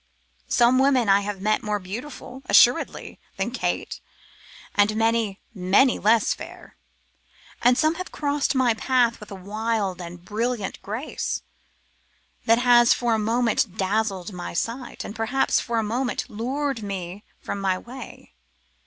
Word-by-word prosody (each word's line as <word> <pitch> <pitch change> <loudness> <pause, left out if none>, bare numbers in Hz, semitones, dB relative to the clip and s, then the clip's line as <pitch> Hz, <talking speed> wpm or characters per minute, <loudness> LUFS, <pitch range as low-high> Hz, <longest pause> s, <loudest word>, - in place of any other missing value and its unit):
Some 245 +1 +4
women 265 -5 +3
I 195 +1 +6
have 200 -1 -5
met 215 +1 +1
more 210 0 -1
beautiful, 245 +6 -8
assuredly, 245 +1 +3 0.2
than - - -1
Kate, - - -3 0.7
and 205 +1 +3
many, 225 -2 +1
many 200 +7 +3
less 220 +1 +3
fair; - - -11 0.9
and 245 +1 +4
some 310 0 +3
have 370 - -8
crossed 290 -1 -1
my 255 -3 +3
path 240 0 +1
with 210 - -11
a 200 - -7
wild 205 -1 -2
and 175 0 -9
brilliant 220 0 -2
grace, 225 +9 -4 1.0
that 230 +1 +5
has 240 -1 +5
for 240 -2 0
a 220 - +1
moment 225 -3 0
dazzled 195 -1 -1
my 175 -1 -6
sight, 240 +7 -3
and 210 - -7
perhaps 225 +4 +1
for 235 -1 -2
a 225 - +1
moment 245 +4 -2
lured 260 +4 -3
me 195 -1 -6 0.2
from 200 - -5
my 190 -1 +1
way. 245 +4 -11
225 Hz, 145 wpm, -24 LUFS, 200-245 Hz, 1.0 s, I